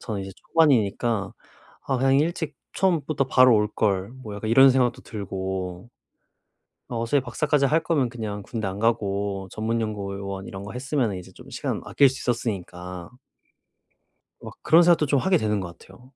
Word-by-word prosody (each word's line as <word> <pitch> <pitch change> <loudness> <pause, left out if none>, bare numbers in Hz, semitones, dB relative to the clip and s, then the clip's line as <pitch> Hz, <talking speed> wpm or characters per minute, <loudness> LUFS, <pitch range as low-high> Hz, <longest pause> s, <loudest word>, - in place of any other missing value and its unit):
저는 105 -3 -4
이제 95 - -7
초반이니까 115 - +1 0.6
'아 135 - +1
그냥 135 +1 +3
일찍 160 +1 -1 0.2
처음부터 155 -7 +1
바로 130 -2 +6
올 105 0 +1
걸.' 100 +1 0
뭐 105 -4 -7
약간 110 +2 -4
이런 135 +3 +8
생각도 125 -2 +1
들고 95 -1 -5 1.0
어 115 0 -2
소위 140 +3 +2
박사까지 140 +3 +1
할 160 +3 +1
거면 145 -7 +1
그냥 110 -4 -5
군대 110 0 -4
안 95 +1 -4
가고 100 -3 -1
전문 115 +2 -1
연구원 100 -2 -4
이런 95 0 -7
거 105 - -8
했으면은 125 -5 -1
이제 90 - -11
좀 - - -15
시간 - - -3
아낄 140 - +4
수 130 +1 -5
있었으니까 90 -7 -4 1.3
막 - - -10
그런 165 +2 +6
생각도 170 -3 +4
좀 140 0 +2
하게 190 -1 +3
되는 105 - 0
것 85 -2 -7
같아요. 110 +7 -17
115 Hz, 330 characters per minute, -24 LUFS, 100-135 Hz, 1.3 s, 이런